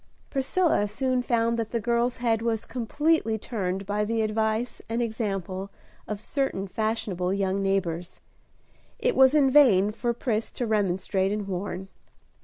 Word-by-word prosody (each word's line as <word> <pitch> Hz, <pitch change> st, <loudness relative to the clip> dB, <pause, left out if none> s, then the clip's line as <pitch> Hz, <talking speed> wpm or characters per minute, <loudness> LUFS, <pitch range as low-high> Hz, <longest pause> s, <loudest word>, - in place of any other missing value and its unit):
Priscilla 275 Hz, -, +1 dB
soon 255 Hz, +4 st, 0 dB
found 235 Hz, -1 st, +1 dB
that 225 Hz, -1 st, -2 dB
the 235 Hz, -, -1 dB
girl's 235 Hz, +2 st, 0 dB
head 230 Hz, -2 st, +1 dB
was 230 Hz, -1 st, -1 dB
completely 255 Hz, 0 st, 0 dB
turned 195 Hz, -4 st, -3 dB
by 205 Hz, +2 st, 0 dB
the 225 Hz, +1 st, 0 dB
advice 220 Hz, +2 st, -1 dB
and 230 Hz, +1 st, -1 dB
example 195 Hz, -5 st, -3 dB, 0.4 s
of 210 Hz, -1 st, -4 dB
certain 220 Hz, -5 st, -2 dB
fashionable 200 Hz, -4 st, -1 dB
young 195 Hz, 0 st, 0 dB
neighbors. 180 Hz, -3 st, -1 dB, 0.8 s
It -, -, 0 dB
was 265 Hz, +2 st, +6 dB
in 275 Hz, -3 st, +5 dB
vain 215 Hz, -9 st, +6 dB
for 240 Hz, +2 st, -1 dB
Pris 230 Hz, -2 st, -2 dB
to 245 Hz, -, -2 dB
remonstrate 195 Hz, -2 st, 0 dB
and 210 Hz, -1 st, -2 dB
warn. 190 Hz, 0 st, -4 dB
220 Hz, 145 wpm, -26 LUFS, 195-240 Hz, 0.8 s, was